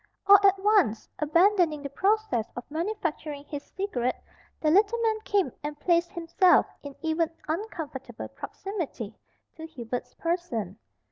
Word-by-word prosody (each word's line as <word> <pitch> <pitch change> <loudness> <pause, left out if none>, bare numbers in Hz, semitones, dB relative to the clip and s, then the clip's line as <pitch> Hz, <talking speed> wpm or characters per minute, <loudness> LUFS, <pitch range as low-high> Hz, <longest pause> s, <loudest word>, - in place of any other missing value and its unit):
All 400 0 +9
at 395 0 +6
once, 390 - +2
abandoning 335 -1 +3
the 280 - -4
process 385 - +1
of 245 - -5
manufacturing 315 -4 -3
his 290 -1 -5
cigarette, 265 -10 -2 0.4
the 305 - +2
little 410 +6 +4
man 445 -1 +1
came 400 -3 +1
and 295 0 -5
placed 345 -1 +2
himself 345 +2 +4 0.2
in 285 -1 -9
even 320 0 +1 0.2
uncomfortable 310 - -5
proximity 330 - -6 0.4
to 320 0 -7
Hubert's 245 -5 -6
person. 240 - -3
330 Hz, 130 wpm, -27 LUFS, 280-390 Hz, 0.4 s, All